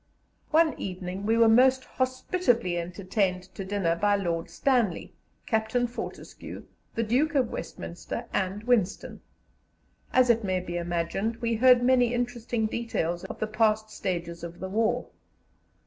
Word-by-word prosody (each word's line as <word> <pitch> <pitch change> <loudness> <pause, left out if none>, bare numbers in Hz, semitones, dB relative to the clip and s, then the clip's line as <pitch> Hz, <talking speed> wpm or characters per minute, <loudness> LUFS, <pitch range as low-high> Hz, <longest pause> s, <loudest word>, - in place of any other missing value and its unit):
One 320 0 +4
evening 185 +1 -5
we 225 +1 +3
were 230 -1 +6
most 255 +3 +5
hospitably 255 - 0
entertained 185 +1 -1
to 195 - -5
dinner 190 -4 0
by 205 +4 +2
Lord 170 -4 -2
Stanley, 240 -10 0 0.3
Captain 220 0 +1
Fortescue, 240 0 -7 0.3
the 230 - +1
Duke 275 +8 +1
of 255 -4 +2
Westminster, 175 +7 -6
and 195 +2 -1
Winston. 220 -5 0 0.9
As 255 -1 +5
it 230 -1 0
may 185 -2 0
be 175 -1 -6
imagined, 175 +6 -1
we 230 0 -1
heard 245 +2 +5
many 245 -1 +4
interesting 240 -2 -1
details 215 -7 -2
of - - -7
the - - 0
past 215 0 +1
stages 170 -4 -4
of 170 0 -7
the 190 - -5
war. 220 +3 0
215 Hz, 140 wpm, -27 LUFS, 185-245 Hz, 0.9 s, were